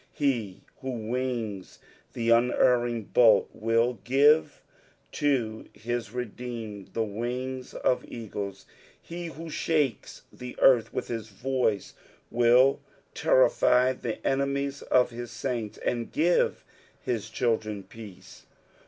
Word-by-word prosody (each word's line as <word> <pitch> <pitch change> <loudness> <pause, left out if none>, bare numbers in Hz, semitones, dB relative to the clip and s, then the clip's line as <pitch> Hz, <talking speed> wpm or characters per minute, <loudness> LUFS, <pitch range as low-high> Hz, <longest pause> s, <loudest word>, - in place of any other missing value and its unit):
He 115 -10 -1 0.2
who 130 - -5 0.2
wings 120 -6 -3 0.4
the 115 0 0
unerring 120 -1 +3
bolt, 110 -4 +5
will 115 +2 +1
give 145 +5 +3 0.5
to 120 -7 -1
his 120 0 -4
redeemed 115 -4 -6
the 115 - +1
wings 125 +4 -4
ot 125 - +2
eagles; 100 -4 -6 0.3
he 170 0 -7
who 165 +1 -8
shakes 150 -6 -1
the 125 0 -8
earth 125 -4 +5
with 125 - -4
his 115 -2 -4
voice, 115 -2 -1 0.4
will 120 +3 +5 0.3
terrify - - +4
the 115 -3 -6
enemies 140 +1 0
of 125 -1 +2
his 120 0 -7
saints, 120 -5 -4
and 120 -1 -2
give 170 +3 +1 0.4
his 110 -3 -2
children 110 -4 -1
peace. 95 -4 -13
120 Hz, 110 wpm, -27 LUFS, 110-130 Hz, 0.5 s, bolt